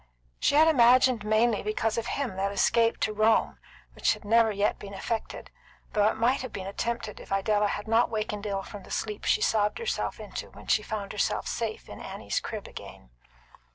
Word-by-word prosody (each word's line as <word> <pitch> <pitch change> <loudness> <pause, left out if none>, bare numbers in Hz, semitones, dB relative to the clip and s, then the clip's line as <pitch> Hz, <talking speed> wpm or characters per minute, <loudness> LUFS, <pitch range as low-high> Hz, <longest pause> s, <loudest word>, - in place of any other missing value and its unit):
She - - +2
had 315 +2 +7
imagined 255 -4 +5
mainly 215 +1 +2
because 215 +1 -1
of 230 - -2
him 270 -9 -2
that 195 +1 0
escape 230 +3 +2
to 215 - +1
Rome 215 +1 +2 0.3
which - - +1
never 225 +2 +4
has 205 - -4
yet 205 +1 +1
been 200 -1 -8
effected, 225 +3 -4 0.4
though 210 0 +4
it - - +1
might 240 +4 +2
have 255 -2 -6
been 190 - -6
attempted 230 +2 -3
if - - -13
Idella 205 +1 +2
had 205 +1 -4
not 225 +2 +3
wakened 215 -1 -3
ill 195 -1 -2
from 205 0 -9
the - - -15
sleep 210 -1 -3
she - - +3
sobbed 210 -1 +2
herself 470 0 -2
into - - -7
when - - -14
she 215 - +3
found 210 -2 -5
herself 210 0 -1
safe 225 -2 -3
in - - -10
Annie's - - -3
crib - - -6
again. 60 - -11
215 Hz, 195 wpm, -28 LUFS, 205-230 Hz, 0.4 s, had